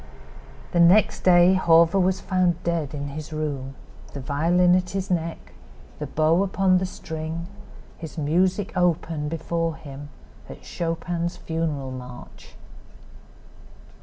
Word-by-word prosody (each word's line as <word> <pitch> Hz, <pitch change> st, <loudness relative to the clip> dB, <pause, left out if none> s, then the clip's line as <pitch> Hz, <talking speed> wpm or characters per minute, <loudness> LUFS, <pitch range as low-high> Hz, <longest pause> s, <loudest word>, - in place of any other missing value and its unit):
The 175 Hz, -, +1 dB
next 180 Hz, +5 st, +5 dB
day 175 Hz, 0 st, +5 dB
Hawver 170 Hz, 0 st, +4 dB
was 190 Hz, 0 st, +1 dB
found 180 Hz, -2 st, 0 dB
dead 165 Hz, -4 st, -2 dB
in 145 Hz, 0 st, -4 dB
his 155 Hz, +2 st, -7 dB
room, 140 Hz, -4 st, -4 dB, 0.4 s
the 140 Hz, -, -6 dB
violin 170 Hz, +6 st, +2 dB
at 180 Hz, 0 st, +1 dB
his 190 Hz, +1 st, -4 dB
neck, 165 Hz, -2 st, -3 dB, 0.5 s
the -, -, -4 dB
bow 160 Hz, +3 st, +2 dB
upon 195 Hz, -1 st, +2 dB
the 185 Hz, -, -2 dB
strings, 160 Hz, -1 st, -6 dB, 0.5 s
his 160 Hz, 0 st, -9 dB
music 185 Hz, +6 st, 0 dB
open 165 Hz, -4 st, 0 dB
before 165 Hz, 0 st, -2 dB
him 145 Hz, -2 st, -10 dB, 0.4 s
at -, -, -11 dB
Chopin's 170 Hz, 0 st, -3 dB
funeral 155 Hz, -5 st, -3 dB
march. 125 Hz, -1 st, -11 dB
165 Hz, 125 wpm, -24 LUFS, 155-180 Hz, 0.5 s, next